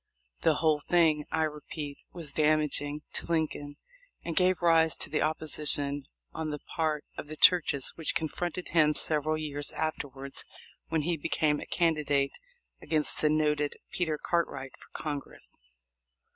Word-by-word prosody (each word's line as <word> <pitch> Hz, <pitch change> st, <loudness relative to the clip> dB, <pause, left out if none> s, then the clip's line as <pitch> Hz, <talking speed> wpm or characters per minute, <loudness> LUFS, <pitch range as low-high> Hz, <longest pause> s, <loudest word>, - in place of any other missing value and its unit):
The 160 Hz, -, +3 dB
whole 155 Hz, -1 st, +3 dB
thing, 155 Hz, -2 st, +3 dB
I 160 Hz, 0 st, +2 dB
repeat, 150 Hz, -1 st, -5 dB
was 160 Hz, -6 st, -6 dB
damaging 150 Hz, -1 st, +1 dB
to -, -, -1 dB
Lincoln, 155 Hz, -3 st, -1 dB, 0.5 s
and 165 Hz, -, -3 dB
gave 185 Hz, -1 st, +3 dB
rise 165 Hz, -2 st, +5 dB
to -, -, -3 dB
the 155 Hz, -, +1 dB
opposition 150 Hz, -2 st, 0 dB, 0.3 s
on 160 Hz, -1 st, -3 dB
the 150 Hz, -, -3 dB
part 155 Hz, 0 st, -2 dB
of -, -, -6 dB
the 155 Hz, -, -7 dB
churches 150 Hz, -7 st, +4 dB
which 160 Hz, -, -2 dB
confronted 175 Hz, +3 st, -2 dB
him 150 Hz, -3 st, +4 dB
several 155 Hz, 0 st, 0 dB
years 145 Hz, -2 st, -1 dB
afterwards 140 Hz, -3 st, -2 dB, 0.4 s
when 160 Hz, -2 st, 0 dB
he 170 Hz, +1 st, 0 dB
became 150 Hz, 0 st, +1 dB
a -, -, -8 dB
candidate 150 Hz, -4 st, +1 dB, 0.4 s
against 155 Hz, -2 st, +1 dB
the 150 Hz, -, +4 dB
noted 150 Hz, -1 st, +1 dB, 0.2 s
Peter 160 Hz, -4 st, 0 dB
Cartwright 140 Hz, -6 st, -1 dB
for -, -, -18 dB
Congress. 145 Hz, -2 st, -5 dB
155 Hz, 145 wpm, -30 LUFS, 145-160 Hz, 0.5 s, rise